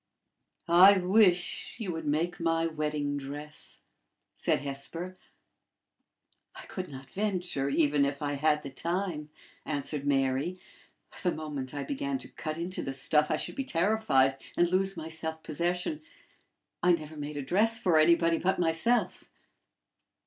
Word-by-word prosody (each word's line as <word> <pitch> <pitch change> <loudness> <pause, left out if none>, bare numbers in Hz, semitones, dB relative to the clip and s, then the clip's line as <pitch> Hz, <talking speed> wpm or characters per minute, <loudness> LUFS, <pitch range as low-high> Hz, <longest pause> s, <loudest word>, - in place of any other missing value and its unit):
"I 185 +4 +8
wish 185 -1 +2
you 215 -6 -3
would 160 -1 -5
make 165 +4 0
my 165 -1 +1
wedding 150 -2 -2
dress," 145 +2 -6 0.5
said - - 0
Hesper. 145 +6 -6 1.4
"I - - -9
could 185 -1 -6
not 135 -1 -10
venture, 180 -9 -1
even 145 -1 +3
if 140 0 -1
I 145 0 -1
had 150 +1 +1
the 140 - -7
time," 170 0 -2 0.3
answered 145 -1 -3
Mary. 135 +6 +1 0.6
"The 180 - +1
moment 145 -4 -5
I 145 - -2
began 280 -1 -2
to - - -10
cut 155 0 -5
into 175 +2 -3
the 135 - -4
stuff, 150 +3 +3
I - - +2
should - - -3
be 275 - -3
terrified, 170 - +2 0.2
and 175 - +4
lose 190 0 +1
my 160 -1 -5
self 160 0 -5
possession. 175 - -2 0.8
I 180 0 +5
never 155 -2 -4
made 145 0 -5
a 145 - -3
dress 215 +10 +3
for 175 -7 +3
anybody 165 +1 +4
but 190 +2 +1
myself." 175 +9 +1
160 Hz, 145 wpm, -29 LUFS, 145-180 Hz, 1.4 s, I